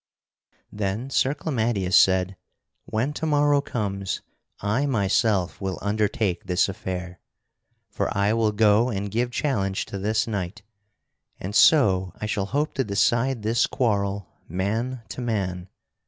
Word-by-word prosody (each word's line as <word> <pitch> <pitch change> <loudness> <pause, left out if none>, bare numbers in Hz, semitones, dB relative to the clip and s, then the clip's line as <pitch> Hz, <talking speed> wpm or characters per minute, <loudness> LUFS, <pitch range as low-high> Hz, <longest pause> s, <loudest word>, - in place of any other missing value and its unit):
Then 105 +6 -3
Sir 135 +2 +2
Clamadius 110 - -1
said: 95 +1 +4 0.5
"When 120 +7 -1
to 160 - -3
morrow 145 -1 +3
comes, 100 -7 -3 0.4
I 115 +8 0
myself 100 - +1
will 95 -1 -2
undertake 105 -2 -1
this 90 +1 +2
affair. 90 -2 -5 0.7
For - - -1
I 100 +2 +2
will 115 -1 +2
go 105 +3 +4
and 100 -3 -3
give 120 +3 0
challenge 100 -8 -1
to 100 - -6
this 105 +2 +1
knight, 100 -1 -4 0.8
and 95 +3 -5
so 100 - +5
I - - -3
shall 100 -2 -1
hope 145 +6 -1
to 135 - 0
decide 115 +3 +1
this 115 +3 +2
quarrel 100 -5 -1 0.2
man 110 +8 -2
to - - -6
man. 95 -6 -2
105 Hz, 135 wpm, -24 LUFS, 95-120 Hz, 0.8 s, so